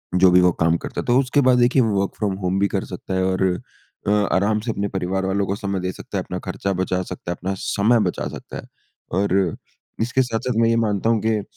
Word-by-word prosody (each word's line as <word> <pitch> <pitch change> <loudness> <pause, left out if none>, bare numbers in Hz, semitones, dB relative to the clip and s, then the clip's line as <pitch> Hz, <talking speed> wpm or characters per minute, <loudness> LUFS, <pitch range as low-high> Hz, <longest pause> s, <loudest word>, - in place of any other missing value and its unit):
जो 90 0 +6
भी 90 0 +6
वो 90 0 +5
काम 85 0 +3
करता - - -5
तो 120 - +2
उसके 135 +2 +2
बाद 125 -1 +5
देखिए 125 +2 +4
वर्क 100 -4 +1
फ्रॉम 100 -3 -1
होम 90 +1 0
भी 100 - +3
कर 95 -1 -2
सकता 95 +1 -6
है 95 0 +1
और 95 0 0 0.6
अ, - - +3
आराम 105 +1 +2
से 115 +2 -3
अपने 100 -2 -2
परिवार 95 0 -2
वालों 100 +1 0
को 100 - -1
समय 100 -2 -3
दे 90 0 -2
सकता - - -7
है, - - -1
अपना - - -5
खर्चा 100 0 -3
बचा 95 0 -1
सकता 90 -1 -6
है, - - -2
अपना 95 +2 -3
समय 110 +4 +2
बचा - - -4
सकता - - -8
है। - - -7 0.6
और 95 -3 +1 0.5
इसके 120 +3 +2
साथ-साथ 125 +1 -2
मैं 115 - +4
ये 115 - +3
मानता 110 -2 +1
हूँ 115 -1 +3
कि, 110 -1 +1
100 Hz, 240 wpm, -22 LUFS, 95-115 Hz, 0.6 s, जो